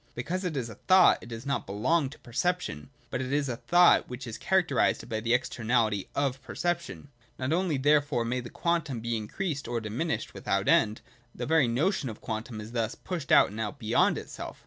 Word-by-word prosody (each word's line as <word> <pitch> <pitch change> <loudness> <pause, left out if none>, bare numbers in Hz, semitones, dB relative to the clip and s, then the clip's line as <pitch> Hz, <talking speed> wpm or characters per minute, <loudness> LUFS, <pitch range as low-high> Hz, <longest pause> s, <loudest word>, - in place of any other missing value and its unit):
Because 175 +10 -3
it 170 -6 -2
is 125 -3 -2
a 115 - -8 0.2
thought, 185 -1 +7
it 120 - -11
does 115 +2 -7
not 140 0 -2
belong 135 - +1
to 150 - -13
perception: 130 - -2 0.2
but 130 - -2
it 130 0 -4
is 145 0 +1
a 120 -3 -3
thought 175 +5 +4
which 125 +1 -6
is 115 -2 -7
characterised 175 -7 +1
by 110 -2 -2
the 115 +1 -2
externality 115 -4 0
of 135 -1 0
perception. 170 -2 -3
— - - -34
Not 130 +4 -1
only 175 -4 +1
therefore 145 -3 +2
may 125 +2 -1
the 120 -1 -7
quantum 160 -7 -1
be 115 +1 -2
increased 140 - -3
or 120 0 -1
dimi 115 +9 -3
nished - - -3
without - - -1
end: 110 0 +3 0.3
the 120 - -4
very 160 -3 +3
notion 135 - 0
of 110 - -8
quantum 110 0 -5
is 105 +1 -8
thus 115 -2 -1
to - - -18
push 170 -6 -4
out - - +6
and 105 - -7
out 110 +6 -3
beyond 115 -4 +2
itself. - - -8
130 Hz, 215 wpm, -28 LUFS, 115-160 Hz, 0.3 s, thought